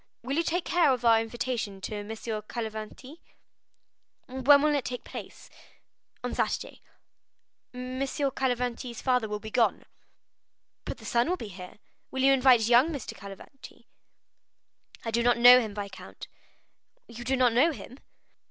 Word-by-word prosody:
Will 265 +3 -2
you 330 - +2
take 340 +1 -2
charge 330 -7 +3
of 245 -1 -8
our 225 -1 +5
invitation 225 -3 -4
to 205 +1 -5
Messieurs 220 0 -5
Cavalcanti?" 230 +6 -7 1.1
"When 265 +3 +4
will 305 0 +3
it 285 -3 0
take 250 -1 -5
place?" - - -10 0.8
"On - - -3
Saturday." - - -2 0.9
"M. 255 +1 -6
Cavalcanti's 255 -3 -2
father 250 -4 +1
will 210 - -2
be 220 0 -9
gone." 235 0 +1 1.0
"But - - -5
the - - -14
son 240 +5 +1
will 365 - 0
be 225 - -7
here; 180 0 -11 0.3
will 265 0 -2
you 275 0 +6
invite 255 -4 +5
young 245 +7 +5
M. 290 - -4
Cavalcanti?" 200 +6 -11 1.2
"I 225 - -2
do 235 +1 +1
not 240 0 +3
know 245 +1 +9
him, 215 -4 -4
viscount." 200 -2 -8 0.8
"You 235 +1 -9
do 260 +2 0
not 250 -2 +3
know 280 +8 +4
him?" 265 -2 -10
245 Hz, 150 wpm, -28 LUFS, 225-265 Hz, 1.2 s, know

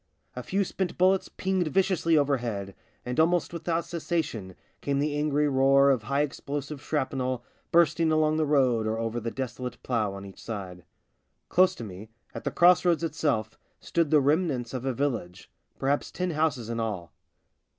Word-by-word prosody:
A 125 - -4
few 195 +10 0
spent 190 -1 -3
bullets 185 +1 +3
pinged 190 -2 -1
viciously 165 -1 +2
overhead, 120 -9 0 0.3
and 125 +3 -2
almost 170 +2 +2
without 170 0 -1
cessation 155 - -3 0.3
came 140 -1 -1
the 145 +1 0
angry 150 0 +1
roar 135 0 +5
of 130 -4 +1
high 140 +6 0
explosive 145 0 -4
shrapnel 130 -4 -2 0.3
bursting 165 -1 +4
along 155 0 +2
the 155 -1 +1
road 130 -6 +3
or 110 +1 -1
over 115 +1 -2
the 115 0 -3
desolate 125 0 -5
plough 110 -5 0
on 100 0 -8
each 95 - -12
side. 95 -6 -7 0.6
Close 185 +1 +4
to - - -7
me, 105 +1 -9 0.2
at - - -7
the - - +1
cross 175 +1 +5
roads 170 -2 +2
itself, 145 -9 -1 0.2
stood 170 -3 0
the 150 -1 +5
remnants 140 -5 +1
of 130 0 -4
a 135 - +1
village 115 -10 -3
— - - -44
perhaps 140 +2 0
ten 180 -1 -2
houses 150 -7 0
in 115 0 -3
all. 95 -8 -4
140 Hz, 170 wpm, -27 LUFS, 115-160 Hz, 0.6 s, roar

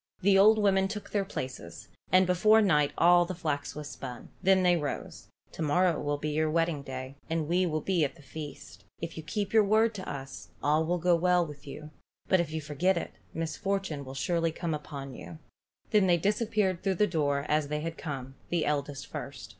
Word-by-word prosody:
The 200 +1 +5
old 210 +3 +7
women 195 -2 +3
took 210 +1 -7
their 205 -1 +1
places, 130 - -7 0.2
and 185 0 +6
before 200 +5 +5
night 150 -9 +3
all 175 +1 +6
the 180 +1 -5
flax 150 -4 -3
was 150 -1 -6
spun. 125 -4 -8
Then 190 0 +4
they 180 -1 +5
rose. 150 -4 -5 0.2
"To - - -8
morrow 170 +3 +2
will 145 0 -1
be 150 +1 -3
your 155 +1 +1
wedding 165 -2 +1
day, 130 0 -7
and 160 -2 -1
we 180 +2 +2
will 155 -1 -1
be 180 0 +1
at 145 - -1
the 160 - -17
feast. 135 - -9 0.2
If 170 0 -5
you 160 - -5
keep 200 +7 -3
your 220 -1 +6
word 220 +3 +3
to 190 -3 -6
us, 135 0 -7 0.2
all 150 +2 +3
will 175 +1 +1
go 175 +1 +3
well 180 +1 +3
with 145 -2 -11
you, 150 +2 -8 0.4
but 185 - +4
if 170 -3 -1
you 160 0 -3
forget 165 +6 +1
it, - - -4 0.2
misfortune 165 -1 -2
will 130 0 -9
surely 165 +5 0
come 165 0 -3
upon 140 -2 -6
you." 85 -5 -9 0.5
Then 205 -3 +4
they 175 -1 +4
disappeared 205 -1 0
through 195 -1 0
the 210 - +3
door 145 -6 0
as 150 -1 +1
they 150 +1 -2
had 165 +1 -4
come, 135 -5 -6 0.2
the 170 -2 0
eldest 140 -2 -2
first. - - -7
165 Hz, 210 wpm, -29 LUFS, 145-185 Hz, 0.5 s, old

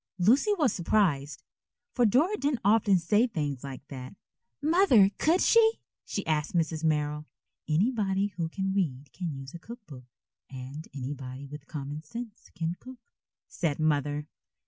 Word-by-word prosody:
Lucy 235 - +4
was 280 - +2
surprised, 165 -6 +1 0.5
for 245 -2 +4
Dora 300 - +3
didn't 285 - -1
often 205 -2 +5
say 210 +8 +3
things 145 - -3
like 135 0 -8
that. 130 +3 -8 0.4
"Mother, 295 - +5
could 335 +4 +3
she?" 450 -1 +5 0.3
she 200 - -4
asked 155 +1 -1
Mrs. 160 -1 0
Merrill. 150 -1 0 0.4
"Anybody 200 +2 +1
who 165 -2 -2
can 190 +2 -2
read 145 -8 -2
can 175 -3 -4
use 135 -1 -8
a 170 - -8
cook 235 +5 -11
book, 130 -7 -11 0.4
and 135 +4 -8
anybody 135 0 -6
with 145 +1 -10
common 145 0 -5
sense 225 +6 -9
can 165 0 -1
cook," 255 -2 -13 0.4
said 155 -5 -2
Mother. 150 -1 +1
165 Hz, 145 wpm, -28 LUFS, 145-220 Hz, 0.5 s, often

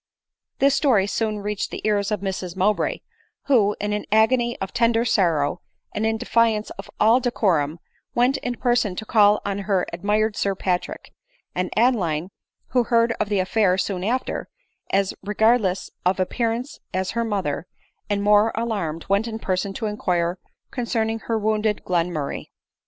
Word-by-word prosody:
This 275 0 +4
story 265 -8 +3
soon 215 +1 -2
reached 210 0 -2
the - - -7
ears 205 -1 +1
of 210 -2 -2
Mrs 190 -2 -4
Mowbray, 205 +3 +1 0.4
who, 210 -7 +3
in 210 0 -1
an 210 - -3
agony 235 +2 +3
of 190 - -5
tender 230 0 +2
sorrow, 165 -10 +1 0.3
and 220 +1 0
in 220 0 0
defiance 225 -1 +1
of - - -9
all 225 +4 +5
decorum, 180 - +1 0.4
went 250 +3 +3
in 245 0 -3
person 240 -6 +1
to 220 - -5
call 210 -2 +4
on 200 0 -2
her 195 -2 0
admired 210 +4 0
Sir 200 -1 0
Pa 185 -1 +1
trick; - - -10 0.4
and 180 0 -1
Adeline, 190 -8 +1 0.4
who 250 -2 +2
heard 230 0 +3
of 210 - -1
the 205 - +1
affair 185 0 +2
soon 185 -1 -2
after, 245 +6 -2 0.4
as 195 0 +1
regardless 210 -2 +1
of 185 +1 +1
appearances 230 +7 -2 0.2
as 185 0 -1
her 235 - -1
mother, 190 -8 -2 0.4
and 200 -1 0
more 210 +2 +5
alarmed, 200 -9 -2
went 200 +4 +1
in 220 -1 -4
person 190 -2 -2
to 220 - -4
inquire 180 -4 -1 0.3
concerning 225 -2 -1
her 225 0 -2
wound 215 0 +1
ed 210 -1 -1
Glenmurray. 170 -5 -1
210 Hz, 165 wpm, -23 LUFS, 190-230 Hz, 0.4 s, all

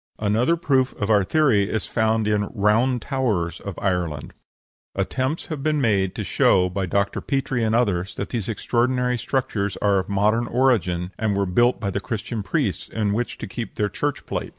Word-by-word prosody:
Another 110 +9 +2
proof 135 -5 +1
of 105 +1 -1
our 105 -2 +5
theory 105 -3 +2
is 110 - -1
found 110 -1 +1
in 105 -1 +2
"the 105 - -3
round 115 +4 +2
towers" 105 - -1
of 100 -4 -6
Ireland. 90 -7 -2 0.6
Attempts 130 - -1
have 155 -4 -5
been 155 +1 +1
made 100 -7 +1
to - - -3
show, 90 -1 +3
by 95 0 -2
Dr. 100 +2 0
Petrie 135 -3 -1
and 110 0 +1
others, 100 -6 0
that 100 - -4
these 115 -3 -3
extraordinary 125 +2 0
structures 105 -7 -1
are 100 -2 +2
of 95 - -5
modern 105 +4 +2
origin, 100 -9 +1
and 105 -2 0
were 100 - +1
built 120 +7 +2
by 100 -3 -2
the 100 - -2
Christian 110 +1 -4
priests, 95 - -1
in 105 -2 -1
which 120 +3 -2
to - - -6
keep 115 -2 -6
their 105 -1 0
church 145 +7 -3
plate. - - -4
110 Hz, 190 wpm, -23 LUFS, 100-125 Hz, 0.6 s, our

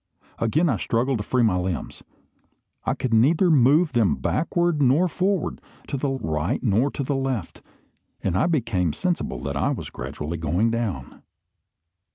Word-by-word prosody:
Again 150 +10 +2
I 125 -8 +1
struggled 120 +5 0
to - - -3
free 125 +3 +1
my 105 -5 +3
limbs. 90 -1 -4 0.8
I - - 0
could 125 -3 -2
neither 155 - +4
move 150 +4 +4
them 115 -6 +2
backward 170 -1 0
nor 140 +7 +4
forward, 185 +1 -1 0.3
to - - -2
the 140 +1 -1
right 80 - -2
nor 115 +4 +2
to 140 - -4
the 140 +1 -1
left; 130 -8 -3 0.6
and 90 - 0
I 155 - +2
became 115 - 0
sensible 170 - -2
that 70 +1 -3
I 70 - +1
was - - -4
gradually 75 +6 -5
going 85 +8 +1
down. 105 - -4
120 Hz, 160 wpm, -24 LUFS, 90-145 Hz, 0.8 s, neither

